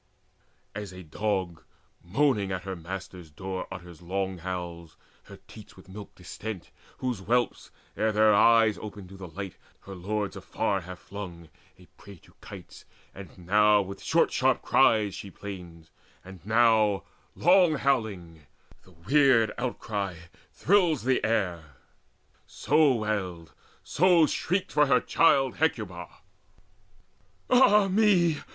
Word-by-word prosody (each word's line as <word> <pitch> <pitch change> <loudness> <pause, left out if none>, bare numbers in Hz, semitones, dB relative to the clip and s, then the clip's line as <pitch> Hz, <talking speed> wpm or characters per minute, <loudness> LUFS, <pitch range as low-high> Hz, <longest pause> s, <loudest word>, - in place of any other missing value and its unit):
As 105 -2 -7
a 90 0 -10
dog 95 0 -3 0.4
moaning 105 +1 +1
at 95 -1 -4
her 95 0 -5
master's 90 0 -8
door, 95 +4 -6
Utters 90 -2 -10
long 95 +1 -3
howls, 85 -2 -7 0.3
her - - -13
teats - - -14
with - - -16
milk 100 +2 -11
distent, 95 +1 -8 0.3
Whose 125 -5 -3
whelps, 120 +4 -1 0.3
ere 110 0 0
their 110 0 +4
eyes 115 0 +4
opened 100 -3 -9
to 95 - -12
the 95 -1 -9
light, 95 +3 -8 0.2
Her 100 - -10
lords 100 +3 -3
afar 100 -2 -2
have 90 +1 -9
flung, 90 -3 -9 0.3
a 90 - -18
prey 100 -1 -13
to 85 - -22
kites; - - -12 0.3
And 100 -1 -12
now 105 +2 +4
with 100 +1 -9
short - - +2
sharp - - +1
cries 105 -3 +3
she 100 - -8
plains, 90 -5 -10 0.3
and 95 -3 -12
now 110 -2 +3 0.3
Long 175 -1 +4
howling: 100 - -2 0.3
the 95 - -21
weird 115 - +3
outcry 105 -6 -3 0.4
thrills 175 - +2
the 130 +1 +1
air; 90 - -2 0.7
So 155 -2 +2
wailed 95 -7 -4 0.5
and 175 -3 +5
shrieked 185 +5 -2
for 150 -1 +3
her 125 -2 +4
child 135 -5 +2
Hecuba: 105 - -2 1.4
"Ah 210 -6 +5
me! 185 -6 +3
100 Hz, 130 wpm, -27 LUFS, 90-120 Hz, 1.4 s, and